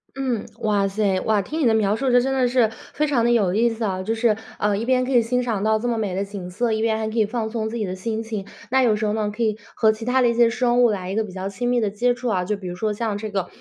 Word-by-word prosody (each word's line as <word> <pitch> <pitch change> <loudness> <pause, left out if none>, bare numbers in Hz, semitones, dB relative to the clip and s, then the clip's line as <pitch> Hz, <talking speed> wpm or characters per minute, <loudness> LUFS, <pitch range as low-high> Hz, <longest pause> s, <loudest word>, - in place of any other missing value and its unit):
嗯， 260 -5 -2 0.2
哇 205 -2 +2
噻。 195 -2 0
哇， 215 -2 +2
听 315 - -4
你 - - +2
的 230 - +4
描 210 -2 +2
述， 255 +3 0
这 245 - +6
真 265 +2 0
的 260 -1 +2
是， 245 -2 +3 0.2
非 300 - 0
常 265 -5 +1
地 240 - +3
有 200 -6 +2
意 235 +2 +3
思 225 0 -3
啊， 185 -2 -2
就 220 +4 -1
是， 225 -1 +2 0.2
啊， 210 -1 +1
一 210 - -2
边 255 +1 +2
可 265 - -4
以 240 - +6
欣 250 +2 0
赏 225 -5 -2
到 220 0 +2
这 245 - -3
么 235 - 0
美 205 -4 -2
的 195 +2 -1
景 195 -3 -7
色， 225 +5 -1
一 220 - -1
边 225 -1 +1
还 220 0 -2
可 220 - -5
以 220 - +4
放 220 +1 -3
松 220 -1 -2
自 235 - -4
己 215 - -1
的 185 -1 -4
心 220 +4 -3
情。 220 -3 -5 0.2
那 265 +1 +3
有 230 -3 +4
时 210 +1 -1
候 210 - 0
呢， 215 -1 -1
可 225 - -6
以 215 -2 +1 0.2
和 220 - +3
其 220 +1 -9
他 250 +2 +2
的 245 - +4
一 235 - +2
些 235 0 +4
生 245 +1 +2
物 240 - +5
来 190 -4 -3
一 195 - -3
个 220 - +1
比 205 - -8
较 190 +1 -5
亲 210 +5 -3
密 245 0 +2
的 215 -3 0
接 240 +5 +1
触 245 +1 -5
啊。 190 -5 +1
就 205 +3 -2
比 190 -2 -8
如 175 - -5
说 215 +4 -1
像 210 -1 -2
这 215 +1 -5
个， 195 -3 -2
220 Hz, 355 characters per minute, -22 LUFS, 205-240 Hz, 0.2 s, 这